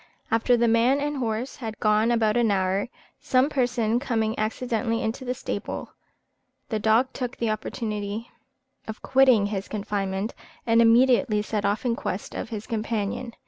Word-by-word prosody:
After 230 +2 +3
the 235 0 +3
man 235 +5 +3
and 290 0 -2
horse 235 +1 -3
had 220 -3 -5
been - - -11
gone 215 +2 +3
about 225 -2 +2
an 240 -2 +3
hour, 195 +2 0 0.3
some 275 -1 +2
person 245 -4 +1
coming 225 -5 0
accidentally 230 +1 -1
into 225 +4 -3
the 250 0 -2
stable, 265 - -5 0.8
the 220 -3 -1
dog 225 +5 +3
took 250 -1 -4
the 230 -2 0
opportunity 215 0 -4 0.6
of 220 - -7
quitting 260 -6 +4
his 200 -1 -3
confinement, 200 -1 -3 0.3
and 230 0 +4
immediately 235 -1 +4
set 210 -1 -2
off 205 +5 0
in 235 -2 +1
quest 195 - -4
of - - -5
his 215 -2 -5
companion. 225 +1 -3
225 Hz, 160 wpm, -25 LUFS, 215-245 Hz, 0.8 s, quitting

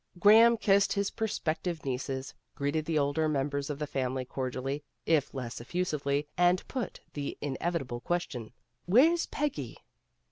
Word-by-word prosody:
Graham 225 +5 +7
kissed 200 -2 +3
his 200 0 0
prospective 175 -6 -2
nieces, 130 0 -3 0.2
greeted 145 +2 -1
the 160 -1 0
older 145 +2 +1
members 140 0 -1
of 145 - -3
the 150 - -2
family 130 -2 -2
cordially, 130 +2 -3 0.2
if 155 -4 +2
less 125 -4 -5
effusively, 145 -1 -1
and 180 +1 +3
put 255 -3 -4
the 145 -1 -4
in 145 -2 -3
evitable 135 -9 -2
question, 150 -10 -2 0.2
" 120 +1 -47
Where's 315 - +5
Peggy?" 295 -1 -3
150 Hz, 145 wpm, -30 LUFS, 135-180 Hz, 0.2 s, Graham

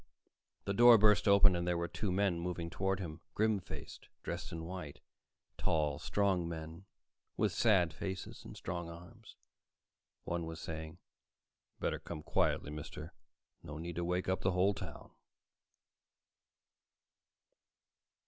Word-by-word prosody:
The 100 - 0
door 120 +2 +9
burst 105 -1 +5
open 100 -2 +7
and 85 0 -1
there 90 -1 +2
were 85 0 -1
two 105 +2 -2
men 95 -2 +2
moving 85 -1 -3
toward 95 +3 0
him, 85 -3 -6
grim 110 -1 +3
faced, - - -9
dressed - - -4
in 80 0 -5
white; 90 -5 -6 0.6
tall, 75 -3 +1
strong 95 -4 +1
men 80 +2 -7 0.5
with - - +2
sad 95 -8 +3
faces 95 +1 -5
and - - -10
strong 85 -1 -4
arms. 90 +7 -12 0.9
One 85 -1 -2
was 80 0 -6
saying, 80 0 -6 0.8
"Better - - -1
come 75 -3 -7
quietly, 75 - +1
mister. 75 0 -7 0.5
No 75 +1 -7
need 85 +1 -5
to 85 - 0
wake 90 +1 -1
up 95 0 0
the 95 - +2
whole 95 +3 +3
town." 90 -6 -8
90 Hz, 135 wpm, -34 LUFS, 80-95 Hz, 0.9 s, door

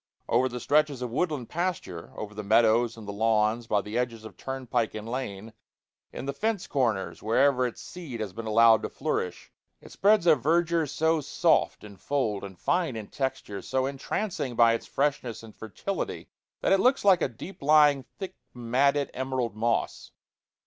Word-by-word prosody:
Over 130 +2 +2
the 125 0 -5
stretches 145 0 +2
of 125 - -4
woodland 150 -3 -1
pasture, 165 - -3
over 105 -1 -6
the 105 - -5
meadows 115 +2 +3
and 110 -2 -10
the - - -3
lawns, 110 +2 +1
by 105 -2 +2
the 105 +4 -3
edges 115 -3 -3
of 110 - -10
turnpike 130 -4 -2
and 110 +1 -6
lane, 115 -4 -5 0.6
in - - -7
the 140 - -2
fence 215 +4 -1
corners 105 - -1
wherever 130 +3 +3
its 120 - -8
seed 160 -10 -8
has 105 -4 -4
been 115 +2 -6
allowed 115 0 +6
to - - -4
flourish 90 - -3 0.3
it - - -15
spreads 205 -2 +3
a 165 - +7
verdure 165 +4 +1
so 160 +2 +1
soft - - +1
in 100 -2 -11
fold 110 -3 -1
and 95 -2 -8
fine 170 - 0
in 110 -2 -7
texture, 130 -7 -3
so 130 +6 -1
entrancing 140 - -3
by 115 -1 +5
its 115 - -4
freshness 135 -5 -1
and 110 -1 -12
fertility, 110 - -5 0.3
that - - +3
it 195 - +4
looks 255 +2 +3
like 185 -4 +6
a - - +2
deep 135 - -10
lying, 145 -1 +5
thick 190 -2 -6 0.2
matted 135 +4 +1
emerald 130 -4 -2
moss. 115 +2 -1
125 Hz, 175 wpm, -27 LUFS, 110-150 Hz, 0.6 s, a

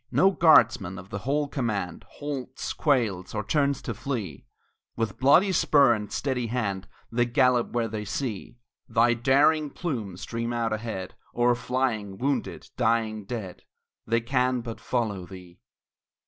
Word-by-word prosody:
No 190 +1 +4
guardsman 115 - +4
of 90 +2 -11
the 100 - -3
whole 145 +6 0
command 110 -10 -3
Halts, 135 -3 -5
quails, 110 - 0
or 105 - -1
turns 140 +3 0
to 115 - -3
flee; 105 - -5 0.5
With 115 -4 -3
bloody 145 +9 +5
spur 140 -7 +5
and 105 -2 -4
steady 130 -4 -1
hand 105 -5 -2 0.2
They 120 +1 +1
gallop 125 -1 +3
where 120 -1 0
they 110 -1 -4
see 115 +1 -4 0.3
Thy 120 +1 +4
daring 140 +5 +3
plume 115 - -4
stream 115 +4 -4
out 115 -2 -1
ahead 110 -4 -5 0.2
O'er 120 0 +4
flying, 120 -5 -2
wounded, 140 +4 -2
dying, 110 -3 0
dead; 100 -4 -6 0.5
They 115 +1 +2
can 125 +1 +1
but 115 -1 -7
follow 105 -7 -2
thee. 90 -1 -12
120 Hz, 145 wpm, -26 LUFS, 105-130 Hz, 0.5 s, bloody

